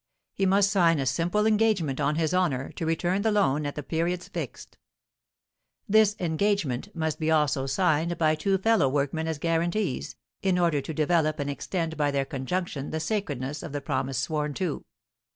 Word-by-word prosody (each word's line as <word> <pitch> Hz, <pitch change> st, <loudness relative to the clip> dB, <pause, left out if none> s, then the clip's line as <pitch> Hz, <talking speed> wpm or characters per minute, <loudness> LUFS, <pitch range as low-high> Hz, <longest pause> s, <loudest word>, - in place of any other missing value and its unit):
He 195 Hz, -, +1 dB
must 200 Hz, +1 st, +4 dB
sign 170 Hz, -5 st, +4 dB
a 135 Hz, -, -1 dB
simple 175 Hz, +9 st, +1 dB
engagement, 210 Hz, -10 st, +2 dB
on 145 Hz, +1 st, +1 dB
his 160 Hz, +1 st, 0 dB
honour, 160 Hz, -8 st, 0 dB
to 165 Hz, -, -4 dB
return 175 Hz, +4 st, 0 dB
the 220 Hz, +1 st, +2 dB
loan 150 Hz, -8 st, +2 dB
at 145 Hz, -, -5 dB
the 150 Hz, -, -5 dB
periods 170 Hz, +4 st, -2 dB
fixed. -, -, -7 dB, 1.1 s
This 215 Hz, 0 st, +4 dB
engagement 180 Hz, -2 st, -1 dB
must 160 Hz, -2 st, -2 dB
be 160 Hz, 0 st, 0 dB
also 145 Hz, -4 st, +2 dB
signed 170 Hz, +1 st, +1 dB
by 155 Hz, -1 st, +3 dB
two 190 Hz, +5 st, +1 dB
fellow 215 Hz, -7 st, +3 dB
workmen 145 Hz, +3 st, -1 dB
as 160 Hz, -2 st, -2 dB
guarantees, 165 Hz, +1 st, -1 dB, 0.3 s
in 190 Hz, -2 st, +2 dB
order 170 Hz, -5 st, +2 dB
to 160 Hz, -, -6 dB
develop 155 Hz, -1 st, +2 dB
and 145 Hz, 0 st, -2 dB
extend 165 Hz, +2 st, -3 dB
by 145 Hz, -1 st, +2 dB
their 140 Hz, -1 st, 0 dB
conjunction 140 Hz, +2 st, -3 dB
the 160 Hz, -, -2 dB
sacredness 150 Hz, -, -3 dB
of 145 Hz, -, -7 dB
the 145 Hz, -, -1 dB
promise 135 Hz, -1 st, -2 dB
sworn 150 Hz, -2 st, -1 dB
to. 180 Hz, -6 st, -2 dB
160 Hz, 175 wpm, -27 LUFS, 145-185 Hz, 1.1 s, must